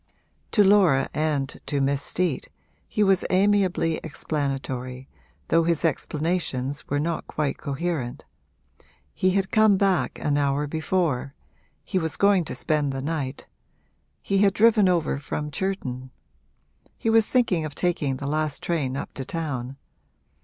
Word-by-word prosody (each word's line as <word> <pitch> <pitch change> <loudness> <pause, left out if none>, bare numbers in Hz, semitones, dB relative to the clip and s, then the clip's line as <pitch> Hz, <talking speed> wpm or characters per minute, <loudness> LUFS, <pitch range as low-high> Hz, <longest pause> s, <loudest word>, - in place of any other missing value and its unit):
To 210 - +6
Laura 190 -9 +5
and 150 -3 -1
to 145 - 0
Miss 140 +1 +1
Steet 170 -2 -1 0.4
he 210 - +1
was 195 -2 +3
amiably 190 -4 +2
explanatory, 135 -4 -3 0.4
though 165 - +4
his 170 0 +1
explanations 150 -3 -1
were 145 - +1
not 165 +2 -2
quite 150 -2 -2
coherent. 140 -3 -3 0.9
He 185 - +2
had 195 -1 -1
come 215 -3 +5
back 190 -7 +1
an 145 -1 0
hour 140 +1 +1
before 155 -3 -1 0.5
he 190 - -1
was 160 -3 -3
going 200 -4 +4
to - - -5
spend 150 -2 0
the 135 - -4
night 145 -3 -3 0.8
he 195 0 +1
had 200 0 +4
driven 215 -3 +5
over 165 -5 +1
from 150 +1 -4
Churton 130 -9 -3 0.9
he 225 - 0
was 225 -1 +4
thinking 215 -10 +2
of 150 -2 -6
taking 155 -7 0
the 140 - -6
last 155 0 -1
train 140 -6 -1
up - - -6
to 135 - -5
town. 135 -4 -4
155 Hz, 140 wpm, -25 LUFS, 140-185 Hz, 0.9 s, To